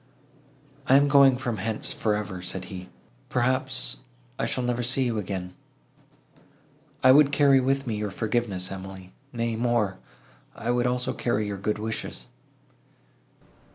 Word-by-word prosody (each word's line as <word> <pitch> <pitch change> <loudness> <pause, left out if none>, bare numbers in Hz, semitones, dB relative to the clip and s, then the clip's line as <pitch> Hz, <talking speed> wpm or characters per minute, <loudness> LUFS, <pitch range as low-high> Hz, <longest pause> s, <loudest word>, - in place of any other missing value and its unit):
"I 130 - +6
am 140 +1 +6
going 135 -2 +6
from 120 -4 -3
hence 110 +2 -2
for 105 -2 0
ever," 100 -3 -4
said 90 +1 -5
he: 90 0 -8 0.4
"perhaps, 130 +1 0 0.4
I - - 0
shall 125 - -1
never 120 0 0
see 125 +2 +1
you 115 -3 -1
again. 90 -2 -5 1.5
I 130 - +8
would 145 +1 +6
carry 140 -2 +5
with 135 +1 0
me 110 -4 -2
your 105 0 -2
forgiveness, 105 -3 -2
Emily; 95 -1 -8 0.2
nay 115 -1 -2
more—I 115 0 -3
would 120 0 +1
also 125 +1 -1
carry 110 -4 -1
your 100 -1 -4
good 105 +2 -1
wishes." 110 +1 -5
115 Hz, 140 wpm, -26 LUFS, 100-130 Hz, 1.5 s, I